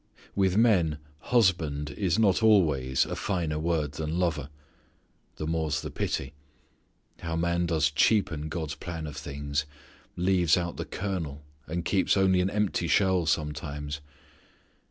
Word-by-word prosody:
With 95 -1 +2
men 90 -10 +3 0.2
husband 85 -12 +1
is 90 +4 0
not 105 -4 +3
always 75 - +3
a - - -4
finer 85 -6 -1
word 80 -3 0
than 80 +3 -3
lover. 80 -6 -1 0.9
The 80 - -4
more's 80 -2 -1
the - - -5
pity. 70 +2 -3 0.9
How 80 -1 -3
man 85 +1 0
does 80 -2 +2
cheapen 80 -2 +2
God's 80 -2 -3
plan 80 +1 -6
of 75 -2 -7
things; 70 +1 -3 0.5
leaves 90 -2 +3
out 85 -1 -3
the - - -4
kernel, 85 -7 -4 0.2
and 85 +2 -3
keeps 95 +1 +2
only 95 -1 +4
an 95 - +1
empty 100 -4 0
shell 95 0 +2
sometimes. 75 -2 -2
80 Hz, 135 wpm, -28 LUFS, 75-95 Hz, 0.9 s, only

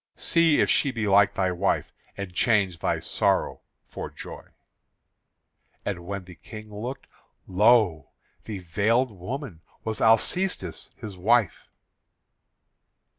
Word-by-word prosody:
See 165 -3 +3
if - - +4
she 140 - +3
be 115 -4 -2
like 100 0 +4
thy 95 -1 +1
wife; 90 +2 -1 0.2
and 100 -2 -6
change 95 -4 +2
thy - - 0
sorrow - - 0 0.2
for - - -7
joy." - - -10 1.4
And 90 -4 -4
when 100 0 -4
the 90 0 -12
King 110 +3 -11
looked, 120 +6 -6 0.4
lo! 95 - +3 0.4
the 105 - -5
veiled 110 +8 +1
woman 100 - -7 0.2
was 110 -1 -3
Alcestis 115 - +1
his 105 -3 -8
wife. 110 +3 +1
105 Hz, 120 wpm, -26 LUFS, 90-115 Hz, 1.4 s, if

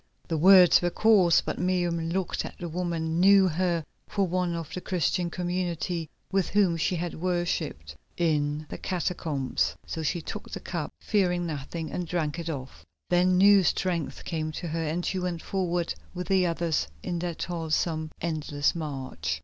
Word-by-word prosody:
The 165 - -1
words 185 +1 +8
were 175 - +1
coarse, 190 -4 +5
but - - -4
Miriam, 175 -2 0
looking 185 +1 -2
at - - -18
the 175 - -5
woman, 165 -1 -2
knew 195 +1 +7
her 170 -1 0 0.2
for 200 -1 0
one 180 -1 -1
of 160 -2 -6
the 180 - -4
Christian 180 0 0
community 175 -2 -2 0.2
with 195 -2 +1
whom 195 -4 +3
she 165 +2 0
had 175 0 -3
worshipped 170 - -2 0.2
in 150 -2 0
the - - -6
catacombs. 160 -6 -1
So 160 - -4
she 160 +3 0
took 160 - -7
the - - -5
cup, - - -4
fearing 180 -4 +1
nothing, 160 +1 -5
and 180 -1 -3
drank 165 -2 -1
it 170 0 -4
off. 135 -4 -6 0.3
Then 180 +1 +4
new 200 +1 +7
strength 175 -3 -1
came 155 -2 -2
to 170 - -5
her, 165 +1 -2
and 160 +3 -2
she 190 - -1
went 180 -2 -3
forward 175 -3 -1 0.2
with 180 +2 -5
the 190 -2 +4
others 165 - 0 0.2
on 175 - -2
that 175 -1 -3
toilsome, 160 -2 -1
endless 155 -3 0
march. 130 - -4
170 Hz, 170 wpm, -27 LUFS, 160-180 Hz, 0.3 s, words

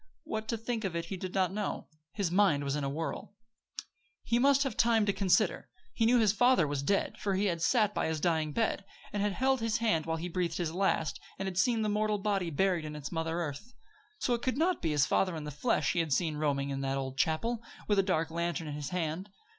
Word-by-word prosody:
What 220 0 -4
to 230 - -1
think 225 0 -3
of 185 -4 -2
it 170 0 -2
he 190 - -5
did 185 0 -6
not 185 -1 +2
know. 210 0 -3 0.3
His 195 -5 -2
mind 185 -7 +3
was 140 0 -1
in 150 - -2
a 140 - -1
whirl. 160 +7 -5 0.9
He 235 - +1
must 275 +1 +4
have 265 -6 -3
time 225 -2 +3
to 200 - +1
consider. 195 -2 +1 0.2
He 225 - +2
knew 245 +1 +5
his 215 -4 +4
father 245 -5 +4
was 145 -1 -2
dead; 200 +8 0
for 200 -2 0
he 195 +2 +1
had 170 -4 0
sat 210 +1 +3
by - - 0
his 160 -1 -1
dying 160 -2 +1
bed, 220 +3 0 0.3
and 205 - -1
had 205 -1 +1
held 265 +4 +2
his 225 -1 +1
hand 195 -9 +1
while 160 0 0
he 170 +2 -4
breathed 175 -2 -2
his 165 -3 -2
last, 175 -5 0 0.2
and 195 - -3
had 185 -1 -2
seen 230 -1 +2
the - - 0
mortal 210 0 +1
body 195 -3 0
buried 175 +2 +1
in 150 0 -6
its 145 -2 -6
mother 165 +1 -2
earth. 165 - -6 0.4
So, 250 - 0
it 235 - -1
could 255 +1 -1
not 345 +2 +1
be 165 - 0
his 145 -2 +3
father 185 +2 +1
in 155 - -5
the 150 - -5
flesh 185 - +1
he 175 - 0
had 165 -3 -1
seen 155 +2 +1
roaming 140 -2 0
in 135 0 -3
that 135 0 -1
old 130 -1 -4
chapel, 220 +11 0 0.3
with 205 -2 +3
a - - +7
dark 165 -4 0
lantern 170 0 -2
in 150 - -4
his 145 -1 -4
hand. 180 +2 -3
185 Hz, 250 wpm, -31 LUFS, 160-215 Hz, 0.9 s, a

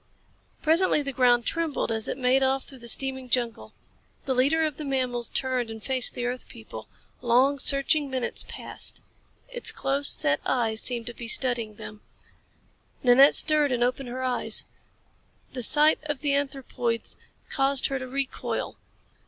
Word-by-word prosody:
Presently 320 -1 +3
the 275 - -4
ground 245 -2 +3
trembled 325 -7 -2
as 220 -1 -2
it - - -3
made 260 0 +2
off 265 0 +1
through 265 -2 -11
the 235 - -10
steaming 265 +1 -2
jungle. 240 -2 -1 0.5
The 265 - 0
leader 280 +6 +2
of 305 -3 -2
the 310 - -6
mammals 255 -4 -2
turned 255 -3 0
and 220 -1 -9
faced 260 -2 +1
the 245 - -3
earth 245 +1 -4
people. 110 0 -11 0.3
Long, 255 +4 +3
searching 280 +1 +3
minutes 260 -2 -2
passed. - - -7 0.5
Its - - -1
close 280 +1 +1
set 145 0 +2
eyes 225 -3 0
seemed 240 -2 -2
to 240 - -7
be 235 0 -8
studying 230 -3 0
them. 210 0 -10 1.0
Nanette 265 +3 +6
stirred 300 -3 +3
and 240 -1 +1
opened 250 +1 -2
her 255 +2 -5
eyes. 250 -1 -1 0.9
The 255 - -4
sight 300 +6 +5
of 295 -3 -4
the 290 -2 0
anthropoids 265 -4 -2 0.4
caused 275 -1 +2
her 270 -1 -1
to 255 - -6
recoil. 270 +1 -4
260 Hz, 160 wpm, -26 LUFS, 240-275 Hz, 1.0 s, Nanette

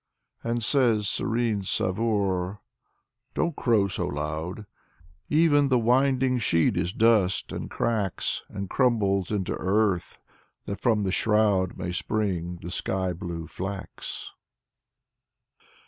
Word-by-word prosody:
" - - -43
And 115 0 -1
says 115 -5 +3
serene 115 -1 0
Savoor: 95 -1 0 0.4
" - - -51
Don't 170 -3 0
crow 110 -5 +2
so 95 - -3
loud 80 +6 -4
I - - -10 0.7
Even 150 -2 +4
the 130 -2 +3
winding 130 +2 +2
sheet 85 -7 +2
is 85 0 0
dust, 110 -4 +2
and - - -5
cracks 105 -5 -1
And 100 0 -5
crumbles 100 -7 +1
into 100 -4 -1
earth, 95 -3 0 0.5
that 100 - -5
from 110 -4 +2
the 95 - 0
shroud 105 -3 +2
May 90 -1 -3
spring 90 -3 -2
the 85 - -5
sky 95 0 -1
blue 85 -2 -5
flax." 95 +2 -6
100 Hz, 125 wpm, -26 LUFS, 90-115 Hz, 0.7 s, Even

